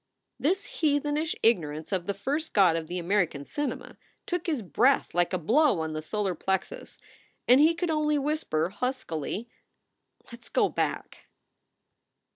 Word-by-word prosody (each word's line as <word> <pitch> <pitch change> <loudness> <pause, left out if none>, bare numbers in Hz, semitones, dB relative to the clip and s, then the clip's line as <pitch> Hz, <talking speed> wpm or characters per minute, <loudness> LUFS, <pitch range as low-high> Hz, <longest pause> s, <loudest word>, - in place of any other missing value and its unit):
This 380 +7 +1 0.2
heathenish 295 +1 +1
ignorance 160 -8 +1
of 185 -2 -1
the 200 - -1
first 290 +10 -3
god 185 -5 +5
of 165 -1 -3
the 180 - -4
American 170 -5 0
cinema, 290 - -4 0.3
took 355 -1 -3
his 295 -9 -1
breath 255 +8 +2
like 175 0 +2
a 185 - 0
blow 230 - +3
on 160 -1 -3
the 155 - -3
solar 195 +3 -2
plexus 190 - -3 0.5
and 250 +2 +7
he 325 +2 +5
could 345 -1 -1
only 300 -1 +1
whisper, 275 - -1
huskily: 215 - -3 0.8
"Let 235 0 -11
s - - -16
go - - +2
back." - - -3
225 Hz, 150 wpm, -27 LUFS, -, 0.8 s, and